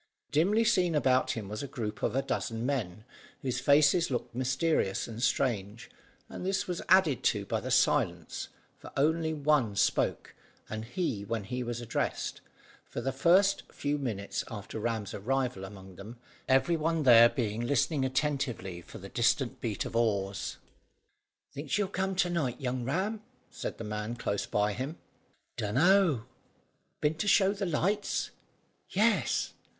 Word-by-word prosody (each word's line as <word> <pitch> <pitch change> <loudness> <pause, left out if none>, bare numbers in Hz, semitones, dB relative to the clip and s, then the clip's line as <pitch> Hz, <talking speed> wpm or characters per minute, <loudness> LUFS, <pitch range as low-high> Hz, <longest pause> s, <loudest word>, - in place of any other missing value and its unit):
Dimly 195 +10 +3
seen 185 -8 +2
about 130 -3 +3
him 110 -4 -5
was 105 +1 -5
a 140 - -4
group 110 -5 -5
of - - 0
a 135 - +1
dozen 115 -3 -2
men, 110 -7 -2 0.4
whose 130 -2 -1
faces 150 +5 +4
looked 120 -3 -3
mysterious 130 -3 0
and 115 0 -7
strange, 115 -4 -1 0.4
and - - -8
this 190 +1 0
was 180 -1 -3
added 175 - +5
to - - +2
by - - -1
the - - -6
silence, - - +1 0.3
for - - -11
only 160 +3 +2
one 145 -8 +1
spoke, - - +1 0.3
and 110 +1 -5
he 125 - -2
when 110 +1 -3
he 125 +6 -4
was 120 -1 -4
addressed, 120 - -2 0.5
for - - -4
the 135 - -1
first 185 +8 +4
few 145 +1 -2
minutes 105 -7 -3
after 105 -1 -6
Ram's 110 -2 -2
arrival 125 -1 -1
among 95 -1 -10
them, 110 +5 -9 0.3
every 135 +6 +4
one 160 0 0
there 120 -2 +8
being 115 -4 -2
listening 140 +3 +1
attentively 130 - -1
for - - -11
the - - -9
distant - - +1
beat - - -2
of - - -6
oars. 100 -4 0 1.0
"Think 145 +1 -7
she'll 205 +7 +1
come 190 0 -2
to 180 -1 +2
night, 140 -8 -1
young 125 -2 -2
Ram?" 195 - -1 0.3
said - - -5
the - - -6
man 105 +2 -4
close 100 -4 -2
by 105 0 +1
him. 135 +9 -4 0.6
"Dunno." 140 - +3 0.8
"Been 150 +1 +2
to 210 - -1
show 195 0 +5
the 200 -2 -3
lights?" 195 +6 0 0.6
"Yes." 205 - +1
130 Hz, 155 wpm, -30 LUFS, 115-165 Hz, 1.0 s, there